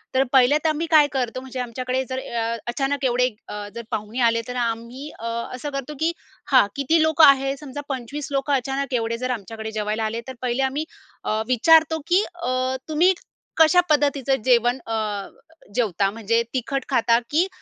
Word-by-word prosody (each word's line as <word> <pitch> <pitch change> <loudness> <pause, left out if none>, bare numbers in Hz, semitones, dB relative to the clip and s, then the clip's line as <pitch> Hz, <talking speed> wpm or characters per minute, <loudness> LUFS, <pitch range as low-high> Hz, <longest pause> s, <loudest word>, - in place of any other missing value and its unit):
तर 265 - +5
पहिले 265 +2 +6
तर 320 - +3
आम्ही 310 +2 -1
काय 305 -2 +7
करतो? 255 -2 -2
म्हणजे 260 0 -7
आमच्याकडे 255 +2 -2
जर 260 0 -2
अ, 230 -2 -2
अचानक 270 +2 -1
एवढे 250 0 +3 0.2
अ, 210 0 -6
जर 235 - -4
पाहुणे 220 +2 -4
आले 230 0 0
तर 250 - -5
आम्ही 235 +4 -3
अ, 230 - -7 0.3
असं 275 +4 -5
करतो, 275 +1 -5
की 325 +1 +2 0.4
हां, 255 -6 +6
किती 300 +4 +2
लोकं 315 0 +6
आहे? 275 -1 +4
समजा 290 0 -7
25 275 +2 -4
लोकं 275 +1 0
अचानक 270 +1 -1
एवढे 230 -1 -1
जर 255 +1 -2
आमच्याकडे 220 -1 -5
जेवायला 215 0 -2
आले, 225 +2 -3
तर 260 - -6
पहिले 250 +2 0
आम्ही 275 +4 -1 0.4
अ, 215 +1 0
विचारतो, 320 +6 +4
की 365 +4 +4
अ, 255 -6 -1
तुम्ही 340 +5 +4 0.4
कशा 320 +2 +6
पद्धतीचं 280 -3 +2
जेवण 245 0 +3
अ, 225 - -3 0.8
जेवता? 200 -5 +1
म्हणजे 230 +1 0
तिखट 270 +2 -2
खाता, 235 -3 +3
की 330 +5 +3
260 Hz, 175 wpm, -23 LUFS, 235-285 Hz, 0.8 s, काय